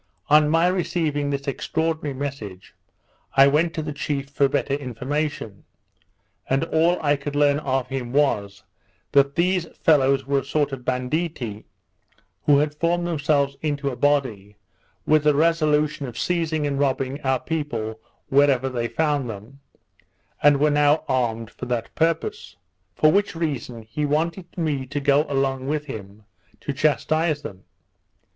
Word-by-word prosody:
On 150 0 +6
my 165 +2 +3
receiving 165 -5 0
this 140 0 -3
extraordinary 155 +1 -2
message, 120 -10 -6 0.6
I 135 - +9
went 155 +4 +2
to 160 - -2
the 150 -1 -4
chief 140 -1 -3
for 140 -1 +2
better 135 - -1
information; 140 -3 -3 0.9
and 135 +3 +2
all 165 +2 +2
I 145 -1 +3
could 145 +1 -6
learn 145 0 +3
of 135 -3 -1
him 130 -3 -4
was, 105 -8 0 0.5
that 140 0 +3
these 180 0 +1
fellows 135 -3 +3
were 140 0 +1
a - - -6
sort 145 +1 0
of 130 -2 -6
banditti, 125 -3 -2 0.8
who 145 -1 +6
had 150 +1 +1
formed 170 +3 0
themselves 145 -4 0
into 145 -2 -1
a - - -6
body, 120 -7 0 0.5
with 155 -1 +3
a 150 - +5
resolution 150 -2 +2
of 120 -2 -9
seizing 160 -2 0
and 140 -1 -1
robbing 135 0 -1
our 130 -2 +1
people 115 -9 -4 0.3
wherever 135 -2 +3
they 120 -2 -2
found 145 -3 0
them, 110 +6 -9 0.8
and 145 -1 +5
were 150 +1 +3
now 145 +1 +3
armed 115 -4 -1
for - - -8
that 120 -2 -3
purpose: 165 - -1 0.4
For 155 - +4
which 200 0 +1
reason 135 -8 -3
he 130 +8 -3
wanted 165 +5 -2
me 145 -6 -1
to 145 +2 -3
go 145 +2 +3
along 135 -1 -1
with 150 +1 -1
him, 105 -5 -9 0.4
to 140 - -3
chastise 155 +1 +1
them. 95 -9 -9
145 Hz, 150 wpm, -23 LUFS, 130-155 Hz, 0.9 s, I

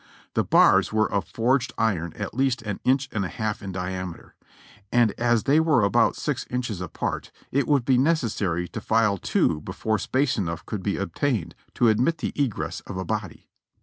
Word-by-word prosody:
The - - +2
bars - - +5
were 110 -1 +2
of 100 -1 -1
forged 125 +1 +1
iron 90 -7 0
at 105 -2 -5
least 130 -1 0
an 105 -3 -4
inch 135 +1 +2
and 100 - -1
a - - -1
half 110 -3 -3
in 95 -1 -5
diameter; 90 -1 -5 0.6
and 120 -3 +4
as 120 -2 +2
they 145 +3 +4
were 155 -8 +3
about 100 - +3
six - - -2
inches 120 -7 -3
apart, 90 - -4 0.2
it 140 +2 +1
would 140 -5 +2
be 130 -1 +4
necessary 110 - 0
to - - -6
file 105 -3 +2
two 75 -2 +1
before 110 +6 -2
space 135 +5 0
enough 85 -3 -3
could 105 -3 -4
be 100 0 -1
obtained 100 - -1 0.2
to 120 - +3
admit 125 +10 +2
the - - -3
egress 135 -7 -2
of 95 - -6
a 95 - -3
body. - - -4
110 Hz, 185 wpm, -25 LUFS, 95-130 Hz, 0.6 s, bars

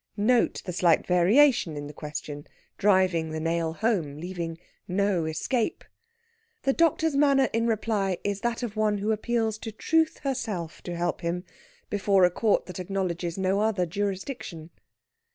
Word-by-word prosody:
Note 235 +4 +2
the 180 - -4
slight 170 -2 +3
variation 180 - +4
in 145 - -5
the 145 - -8
question, 150 -1 -7 0.3
driving 185 -5 +3
the 155 0 -4
nail 165 0 -1
home, 170 -9 -1
leaving 170 -1 -5 0.3
no 190 -2 +1
escape. 220 - -1 0.8
The 270 - +2
doctor's 320 -1 +2
manner 275 -2 +4
in 230 +1 +1
reply 210 -4 0
is 200 -1 -2
that 235 +1 -1
of 225 -3 -4
one 215 -1 +1
who 205 +2 -1
appeals 220 0 0
to 220 - -6
Truth 320 +8 +1
herself 220 - -3
to 175 - -4
help 175 +2 -2
him, 175 +1 -2 0.5
before 195 -2 +4
a 180 - +2
court 215 +4 +1
that 180 -1 -8
acknowledges 180 -2 -2
no 190 +1 +1
other 210 -4 +1
jurisdiction. 190 - -4
195 Hz, 150 wpm, -27 LUFS, 170-225 Hz, 0.8 s, variation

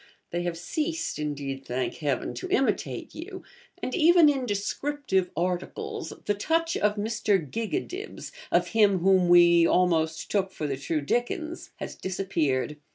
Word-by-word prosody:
They 175 - -1
have 175 -1 -3
ceased, 315 - -3
indeed, 140 -2 -4
thank 125 0 -3
Heaven! 145 -5 -1
to 370 - -6
imitate 270 -8 0
you; 370 +3 -8 0.4
and - - -2
even 340 -2 +6
in 270 -3 0
'descriptive 205 -1 -1
articles' 180 +1 -3
the 205 - +2
touch 330 +10 0
of 210 0 +1
Mr. 210 -1 +1
Gigadibs, 230 - -4 0.2
of - - +2
him 210 -3 +4
whom 185 0 +3
'we 170 -1 +7
almost 160 -3 +1
took 195 -2 +1
for 155 - -5
the 140 -2 -2
true 150 +3 -2
Dickens,' 280 - -2
has - - -6
disappeared. 155 -7 -1
190 Hz, 145 wpm, -27 LUFS, -, 0.4 s, we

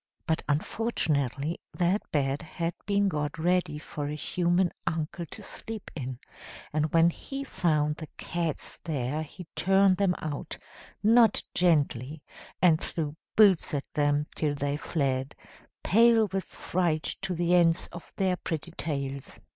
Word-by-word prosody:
But 160 -1 0
unfortunately 150 - 0
that 180 +3 +1
bed 140 -1 0
had 165 +1 -3
been 200 0 +3
got 150 -3 -2
ready 175 -1 +1
for 150 -1 -5
a 150 - -3
human 175 +3 +1 0.2
uncle 165 +2 -2
to 210 - -11
sleep 220 +2 -7
in; 130 -4 -4 0.6
and 155 0 +1
when 165 +1 +5
he 275 +9 -6
found 150 - +1
the 155 - -7
cats 170 -3 -3
there 145 -1 -2
he 165 +4 -9
turned 195 0 +4
them 190 -2 +2
out, 150 -3 -5 0.5
not 225 +1 +5
gently, 150 -4 +1 0.4
and 165 -3 +5
threw 150 -3 -3 0.2
boots 195 -8 +5
at 140 - -2
them 145 0 +2
till 150 -2 0
they 140 0 -1
fled, 135 -3 -1 0.5
pale 230 +2 +5
with 190 -1 -2
fright 170 -4 -1 0.2
to 190 -2 -2
the 175 +1 +1
ends 170 -2 +4
of 170 -1 -10
their 185 -2 +1
pretty 165 0 -4
tails. 140 -5 -4
165 Hz, 140 wpm, -28 LUFS, 145-180 Hz, 0.6 s, when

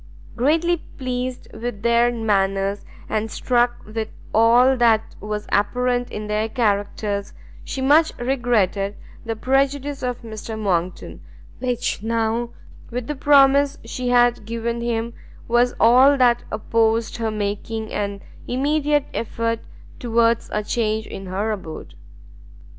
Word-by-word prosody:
Greatly 325 +7 +2
pleased 255 -4 -5
with 220 -2 -5
their 235 +1 +4
manners, 200 -3 0 0.2
and 220 +1 -1
struck 240 +1 0
with 220 +1 -4 0.3
all 240 +4 +5
that 230 -3 +2
was 210 0 -4
apparent 245 +4 +1
in 210 - -5
their 210 +1 -1
characters, 205 -3 -1 0.3
she 265 - -5
much 310 +4 +5
regretted 230 -6 0 0.3
the 225 0 -2
prejudice 275 +3 0
of 250 -1 -3
Mr 220 0 -7
Monckton, 185 -4 -2 0.4
which 245 -5 -2
now, 230 +1 -1 0.4
with 245 0 -4
the 295 - -3
promise 280 0 +4
she 250 +2 -3
had 245 -2 +3
given 230 +2 -3
him, 235 0 -2 0.3
was 240 +1 +2
all 260 +5 +6
that 240 -2 +3
opposed 225 +1 0
her 225 -1 -1
making 215 +1 -3
an 200 -1 -3 0.3
immediate 290 +2 +1
effort 230 0 -2 0.4
towards 230 -1 +1
a 210 - -1
change 220 0 -1
in 195 0 -8
her 200 +4 -1
abode. 185 -7 -7
230 Hz, 125 wpm, -22 LUFS, 215-250 Hz, 0.4 s, all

